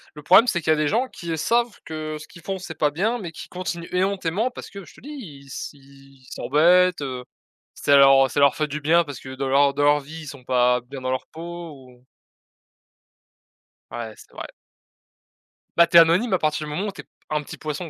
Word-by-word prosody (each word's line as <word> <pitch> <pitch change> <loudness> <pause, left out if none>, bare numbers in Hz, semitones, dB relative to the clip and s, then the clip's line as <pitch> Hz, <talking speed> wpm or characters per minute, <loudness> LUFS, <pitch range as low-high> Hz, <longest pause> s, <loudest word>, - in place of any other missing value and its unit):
Le 150 - -9
problème, 225 - +6
c'est 175 - +1
qu'il 155 - +1
y - - +6
a - - +2
des 150 -1 0
gens 245 - +1
qui, 170 -7 -8
heu, 160 - -2
savent 235 +6 0
que 155 -1 -5
ce 150 - -11
qu'ils 170 - -15
font 190 +3 -4
c'est 175 -3 -8
pas 150 -1 +2
bien, 215 +10 -1
mais 175 -6 -6
qui - - -10
continuent 180 -2 -5
éhontément, 190 +4 0
parce - - -10
que 200 -1 -10
je - - -16
te - - -16
dis, 285 - -12
ils 160 - -10
s 135 - -6
ils 135 -1 -20
s'embêtent, 180 +3 +3
heu, 130 -3 -5 0.5
ça 145 - +2
leur 135 -1 +6
ça 140 - 0
leur 140 -1 +5
fait 155 - 0
du 150 +1 -5
bien, 165 +3 +3
parce 145 -4 -9
que 130 - -9
dans 135 +1 -3
leur 140 +1 +3
dans 145 +1 -1
leur 145 0 +4
vie, 160 +3 -10
ils - - -11
sont 140 -3 -10
pas 125 0 +2
bien 135 +3 -9
dans 130 0 -3
leur 130 - -2
peau 170 +1 -8
ou 125 -2 -17 1.9
Ouais, 115 -2 -6
c'est - - -17
vrai. - - -7 1.3
Bah, 170 0 +6
tu 170 - +5
es - - +12
anonyme 175 +8 +4
à 185 - +2
partir 155 0 -1
du 150 - -6
moment 195 +7 -2
où - - -3
tu - - -9
es - - -21
p - - -41 0.2
un 150 -1 -1
petit - - -10
poisson, 155 +2 -5
155 Hz, 240 wpm, -23 LUFS, 140-175 Hz, 1.9 s, es